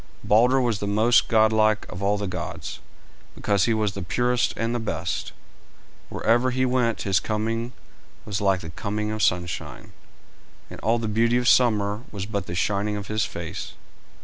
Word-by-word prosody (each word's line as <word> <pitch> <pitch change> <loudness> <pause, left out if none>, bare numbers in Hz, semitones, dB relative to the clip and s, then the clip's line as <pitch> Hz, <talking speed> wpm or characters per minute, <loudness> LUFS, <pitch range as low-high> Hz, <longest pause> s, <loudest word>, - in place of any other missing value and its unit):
Balder 125 +5 +4
was 120 -5 0
the 100 - -3
most 110 +4 +3
godlike 110 -1 +3
of 90 - -8
all 100 +1 +1
the 100 - -3
gods, 90 -4 -5 0.6
because 100 -2 +1
he 115 - +2
was 105 -2 0
the 100 - -5
purest 120 +7 +1
and 115 +1 -1
the 120 - -1
best. 110 - -3 0.8
Wherever 120 +3 +2
he 130 +1 +1
went 125 -3 0
his 95 -2 +2
coming 115 +2 -2 0.5
was 105 -1 -3
like 95 -2 +2
the 80 - -8
coming 105 +4 -3
of 110 0 -3
sunshine, 90 -3 -2 0.8
and - - -8
all 115 +3 +1
the 115 -1 -3
beauty 115 +3 +2
of 125 0 0
summer 105 -4 +3
was 100 -2 -5
but 100 -3 -4
the 85 - -4
shining 105 +3 0
of 100 - -7
his 110 0 0
face. - - -6
110 Hz, 175 wpm, -24 LUFS, 100-115 Hz, 0.8 s, Balder